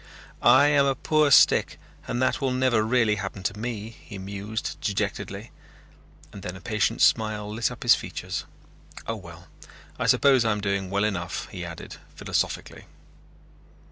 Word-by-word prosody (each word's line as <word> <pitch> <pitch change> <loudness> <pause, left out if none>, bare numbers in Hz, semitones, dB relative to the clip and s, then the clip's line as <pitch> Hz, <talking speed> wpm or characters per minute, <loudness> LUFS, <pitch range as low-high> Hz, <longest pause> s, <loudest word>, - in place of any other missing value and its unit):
"I 145 - +6
am 140 -1 +4
a 135 - +1
poor 155 +2 +2
stick 140 - +5 0.3
and 120 - -2
that - - 0
will 135 - +1
never 125 -3 +2
really 110 -1 +2
happen 95 -1 -6
to 100 - -1
me," 110 -2 -4
he 105 -2 -12
mused 100 +3 -5
dejectedly, 100 - -3 0.8
and 100 - -9
then 90 0 -6
a - - -9
patient 105 0 0
smile 110 -1 +2
lit 115 +1 0
up - - -9
his - - +7
features. - - -4 0.6
"Oh 115 - -3
well, 85 -3 -12 0.5
I - - 0
suppose 135 -4 +5
I'm 110 -2 0
doing 100 -2 -2
well 100 +1 0
enough," 95 -5 -2
he - - -7
added - - -8 0.2
philosophically. - - -3
110 Hz, 155 wpm, -25 LUFS, 100-120 Hz, 0.8 s, his